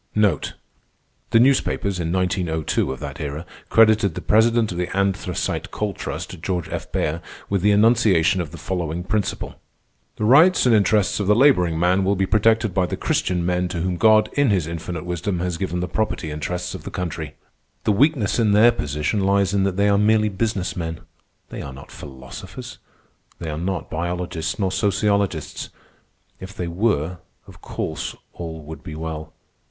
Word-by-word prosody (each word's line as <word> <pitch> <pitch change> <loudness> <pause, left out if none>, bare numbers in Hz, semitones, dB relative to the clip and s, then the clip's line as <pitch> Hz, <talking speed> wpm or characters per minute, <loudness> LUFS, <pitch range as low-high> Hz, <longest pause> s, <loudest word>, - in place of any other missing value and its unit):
The 105 +3 -2
newspapers, 115 -7 +2
in 85 -1 -2
1902 90 -6 0
of 65 - -6
that 70 +1 -6
era, 75 +3 -4 0.2
credited 110 -5 +4
the - - -4
president 110 0 +3
of 90 - -4
the 90 0 -1
Anthracite 95 -2 -1
Coal 105 -2 -3
Trust, 90 -1 -6
George 90 -1 -2
F. - - -5
Baer, 80 +2 -1 0.3
with 100 -2 +1
the 105 - +3
enunciation 105 -5 +4
of 80 - -5
the 85 - -10
following 85 0 -3
principle: 100 +2 -3 0.6
"_The 105 - 0
rights 160 +9 +6
and 125 - +5
interests 105 -1 +3
of 100 - -1
the 105 - +5
laboring 90 - +4
man 90 +3 +3
will 100 +2 +2
be 95 0 +1
protected 110 0 +2
by 90 -1 +1
the - - -4
Christian 90 -2 0
men 90 0 +1
to 90 -1 -4
whom 90 +1 -1
God 110 +2 +4
in 145 -3 +3
His 95 -6 +2
infinite 85 0 -5
wisdom 90 +2 -2
has 90 -1 -2
given 90 -2 -2
the 90 - -2
property 95 -7 -2
interests 90 +4 -4
of - - -7
the - - -6
country._" 80 -4 -4 0.5
"The - - +2
weakness 125 0 +2
in 110 -3 +3
their 110 +3 +7
position 75 +3 -2
lies 100 0 +2
in 100 -1 +2
that 95 -1 -1
they 100 0 +3
are 100 0 +3
merely 105 0 +3
business 100 -1 -2
men. 80 -2 -4 0.5
They - - -6
are 70 - -7
not 70 +1 -12
philosophers. 65 -3 -9 0.6
They 80 -2 -5
are - - -3
not 95 +2 -3
biologists 85 -1 -3
nor 95 -3 0
sociologists. 100 -4 0 0.7
If 95 +2 -9
they 90 -5 -3
were, 85 -2 0 0.3
of - - -15
course - - -4 0.2
all 80 -2 -7
would 80 +2 -9
be 75 - -8
well. 80 -1 -6
95 Hz, 175 wpm, -22 LUFS, 85-105 Hz, 0.7 s, their